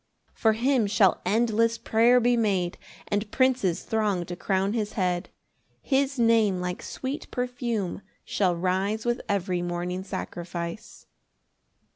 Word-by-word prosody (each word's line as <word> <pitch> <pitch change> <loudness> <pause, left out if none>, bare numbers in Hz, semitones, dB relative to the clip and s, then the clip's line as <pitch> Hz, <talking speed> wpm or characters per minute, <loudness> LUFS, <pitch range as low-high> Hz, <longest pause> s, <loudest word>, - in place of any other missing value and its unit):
] - - -42
4 220 -1 +2
For - - -7
him 255 -3 +2
shall 200 -2 +3
endless 230 +1 +2
prayer 235 +3 +4
be 245 0 +3
made 195 -6 0 0.3
And 205 +1 -1
princes 255 -9 +1
throng 210 -5 0
to 175 - -6
crown 195 +2 0
his 215 -2 -2
head; 180 -3 -1 0.5
His 275 0 0
Name 225 -5 +3
like 180 0 -3
sweet 275 +3 -5
perfume 240 -7 -2 0.2
shall 185 -4 +1
rise 190 +5 -1
With 240 +1 0
every 185 -3 0
morning 175 +1 -3
sacrifice. 170 -1 -6
210 Hz, 135 wpm, -26 LUFS, 180-235 Hz, 0.5 s, prayer